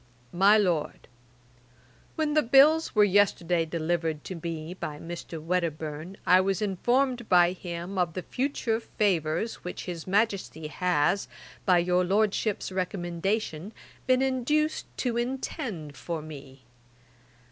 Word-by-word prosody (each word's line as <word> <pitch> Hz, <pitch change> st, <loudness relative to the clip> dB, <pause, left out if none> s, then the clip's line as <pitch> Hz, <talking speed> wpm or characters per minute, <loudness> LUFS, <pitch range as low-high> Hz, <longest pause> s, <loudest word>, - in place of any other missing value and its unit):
'MY 195 Hz, +4 st, +6 dB
LORD, 180 Hz, -7 st, -1 dB, 1.1 s
'When 310 Hz, -2 st, 0 dB
the 305 Hz, -, +4 dB
bills 290 Hz, +5 st, +5 dB
were 210 Hz, -, +6 dB
yesterday 180 Hz, -4 st, +2 dB
delivered 160 Hz, -1 st, -2 dB
to 185 Hz, -3 st, -6 dB
me 165 Hz, 0 st, -5 dB
by 150 Hz, -5 st, -6 dB
Mr. 170 Hz, 0 st, -7 dB
Wedderburne, 160 Hz, +1 st, -3 dB
I 185 Hz, +1 st, +6 dB
was 195 Hz, -1 st, 0 dB
informed 240 Hz, +5 st, 0 dB
by 175 Hz, -1 st, +6 dB
him 175 Hz, +1 st, -5 dB
of 175 Hz, -2 st, +1 dB
the 185 Hz, -, -4 dB
future 250 Hz, -4 st, -1 dB
favours 185 Hz, -2 st, -1 dB
which 180 Hz, -, -6 dB
his 175 Hz, -2 st, -6 dB
Majesty 195 Hz, -5 st, 0 dB
has, 180 Hz, +2 st, +1 dB, 0.4 s
by 180 Hz, -2 st, +6 dB
your 180 Hz, +1 st, +2 dB
Lordship's 205 Hz, +2 st, 0 dB
recommendation, 185 Hz, +1 st, -2 dB, 0.3 s
been 255 Hz, 0 st, +4 dB
induced 295 Hz, +4 st, 0 dB
to 240 Hz, -2 st, -1 dB
intend 240 Hz, -, -4 dB
for 165 Hz, -3 st, -5 dB
me. 140 Hz, -4 st, -11 dB
185 Hz, 125 wpm, -27 LUFS, 170-220 Hz, 1.1 s, MY